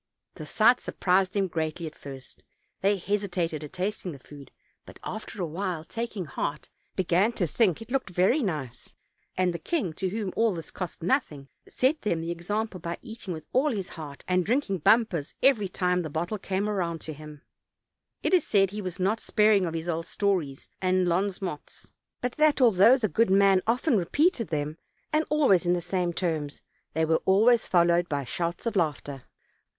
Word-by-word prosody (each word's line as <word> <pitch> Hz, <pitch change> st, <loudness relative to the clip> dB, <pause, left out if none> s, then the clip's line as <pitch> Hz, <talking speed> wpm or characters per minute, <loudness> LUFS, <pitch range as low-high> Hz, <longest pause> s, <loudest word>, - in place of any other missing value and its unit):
The 155 Hz, -, -9 dB
sight 230 Hz, +8 st, +4 dB
surprised 185 Hz, 0 st, +1 dB
them 195 Hz, -2 st, +1 dB
greatly 160 Hz, 0 st, -3 dB
at 155 Hz, -, -6 dB
first; 135 Hz, -3 st, -11 dB, 0.4 s
they 200 Hz, +1 st, +3 dB
hesitated 180 Hz, -5 st, -2 dB
at 150 Hz, -, -9 dB
tasting 185 Hz, -1 st, -3 dB
the -, -, -9 dB
food, 140 Hz, 0 st, -13 dB, 0.3 s
but -, -, -13 dB
after 215 Hz, 0 st, -6 dB
awhile, 170 Hz, 0 st, -3 dB
taking 220 Hz, +1 st, -4 dB
heart, 145 Hz, 0 st, -4 dB, 0.2 s
began 190 Hz, +5 st, +2 dB
to 195 Hz, -, 0 dB
think 190 Hz, +2 st, +1 dB
it 225 Hz, -, -17 dB
looked 270 Hz, -6 st, -1 dB
very 185 Hz, -, +2 dB
nice, 145 Hz, -, -4 dB, 0.4 s
and 180 Hz, -1 st, +2 dB
the 170 Hz, -, -5 dB
king, 195 Hz, -, -1 dB
to 185 Hz, +4 st, -2 dB
whom 200 Hz, -1 st, -3 dB
all 225 Hz, -4 st, +2 dB
this 165 Hz, -2 st, -8 dB
cost 180 Hz, -2 st, -6 dB
nothing, 150 Hz, -, -1 dB, 0.2 s
set 275 Hz, +5 st, +1 dB
them 170 Hz, -6 st, 0 dB
the 165 Hz, +1 st, -3 dB
exam 205 Hz, +6 st, -2 dB
ple, 190 Hz, -4 st, -10 dB
by 170 Hz, +1 st, -4 dB
eating 225 Hz, -5 st, -7 dB
with 160 Hz, -2 st, -6 dB
all 275 Hz, +4 st, +3 dB
his 195 Hz, -5 st, -3 dB
heart, 150 Hz, -4 st, -9 dB
and 180 Hz, 0 st, +2 dB
drinking 215 Hz, -3 st, 0 dB
bumpers 180 Hz, -5 st, +2 dB
every 245 Hz, -7 st, +4 dB
time 180 Hz, 0 st, 0 dB
the 160 Hz, -, -5 dB
bottle 175 Hz, +8 st, -3 dB
came 195 Hz, +2 st, -2 dB
round 175 Hz, -6 st, -1 dB
to 155 Hz, -, -5 dB
him. 150 Hz, 0 st, -11 dB, 0.8 s
It -, -, 0 dB
is 365 Hz, -, +5 dB
said 195 Hz, -2 st, +3 dB
that -, -, -15 dB
he 210 Hz, -, -4 dB
was 185 Hz, -1 st, -5 dB
not 200 Hz, +4 st, +1 dB
sparing 210 Hz, -5 st, +3 dB
of 165 Hz, -, -4 dB
his 165 Hz, +1 st, -4 dB
old 165 Hz, 0 st, -2 dB
stories 180 Hz, -11 st, -1 dB
and 185 Hz, -1 st, +2 dB
Ions 195 Hz, +2 st, -1 dB
mots, 165 Hz, -6 st, -7 dB, 0.3 s
but 250 Hz, -, -1 dB
that 305 Hz, -1 st, +4 dB
although 230 Hz, 0 st, +6 dB
the 230 Hz, -5 st, 0 dB
good 225 Hz, +1 st, +2 dB
man 195 Hz, -1 st, +5 dB
often 245 Hz, 0 st, +2 dB
repeated 270 Hz, -, +1 dB
them, 150 Hz, +1 st, -3 dB, 0.3 s
and 310 Hz, +1 st, +3 dB
al 300 Hz, -2 st, +3 dB
ways 185 Hz, -2 st, +4 dB
in 175 Hz, -, +4 dB
the 175 Hz, -, +1 dB
same 180 Hz, 0 st, -1 dB
terms, 160 Hz, -5 st, -3 dB, 0.3 s
they 160 Hz, +1 st, +1 dB
were 160 Hz, 0 st, +2 dB
always 220 Hz, +5 st, +4 dB
followed 175 Hz, -1 st, +3 dB
by 145 Hz, -2 st, -1 dB
shouts 170 Hz, -, -3 dB
of 230 Hz, -, -1 dB
laughter. 145 Hz, -6 st, -2 dB
185 Hz, 190 wpm, -27 LUFS, 165-215 Hz, 0.8 s, although